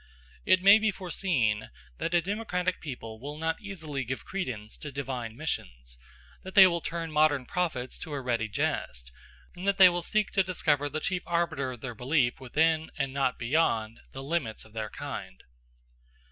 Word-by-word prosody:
It 185 0 +5
may 200 +2 +9
be 220 0 +2
foreseen 170 - 0 0.3
that 170 - 0
a 170 - +3
democratic 185 -2 -1
people 115 -7 -7
will 145 +4 -6
not 160 +1 -2
easily 160 -9 -4
give 130 +2 -5
credence 125 - -4
to 150 - -7
divine 125 -4 -4
missions; - - -4 0.4
that 190 +1 -9
they 195 -2 +11
will 170 -2 +2
turn 165 0 -4
modern 150 -3 +3
prophets 140 -7 -2
to 155 - -7
a 140 - -2
ready 120 -3 -1
jest; 60 - -2 0.4
and 180 +2 -6
they 200 - +5
that 180 - +8
will 175 0 -1
seek 210 +4 0
to 195 - +3
discover 150 -6 +1
the 155 +2 -3
chief 180 +1 -1
arbiter 160 -6 0
of 120 - -11
their 125 -2 -5
belief 125 +2 +1
within, 160 +5 +1
and 135 -2 -1
not 135 -2 +1
beyond, 115 -4 +1
the 135 - -7
limits 140 -9 -2
of 110 - -18
their 110 -1 -3
kind. 65 - -7
150 Hz, 175 wpm, -29 LUFS, 120-175 Hz, 0.4 s, they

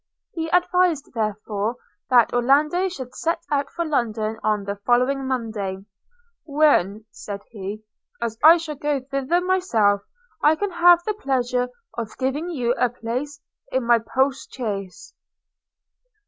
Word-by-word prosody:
He 325 -1 -3
advised 360 -4 +2
therefore 215 0 -2 0.3
that 245 -3 +5
Orlando 295 +9 +3
should 260 -8 -8
set 330 +1 -1
out 280 -1 0
for 340 - -3
London 225 -7 -1
on 210 -1 0
the 200 +1 -4
following 250 +5 +1
Monday 215 -7 -3 0.3
– 475 -1 -42
'when,' 280 - +2
said 200 -1 -7
he, 210 0 -6 0.4
'as 230 -1 -2
I 325 +3 +9
shall 320 -2 -5
go 295 0 0
thither 275 +5 0
myself, 235 - +2 0.4
I 305 +1 +5
can 405 +4 -2
have 345 0 +6
the 430 - -1
pleasure 250 - -1 0.3
of 220 -2 -6
giving 275 +6 -2
you 245 -8 0
a 250 - +3
place 250 +5 -5 0.3
in 260 -2 0
my 235 0 +5
post 265 +4 -1
chaise.' 200 -7 -5
260 Hz, 140 wpm, -23 LUFS, 220-310 Hz, 0.4 s, I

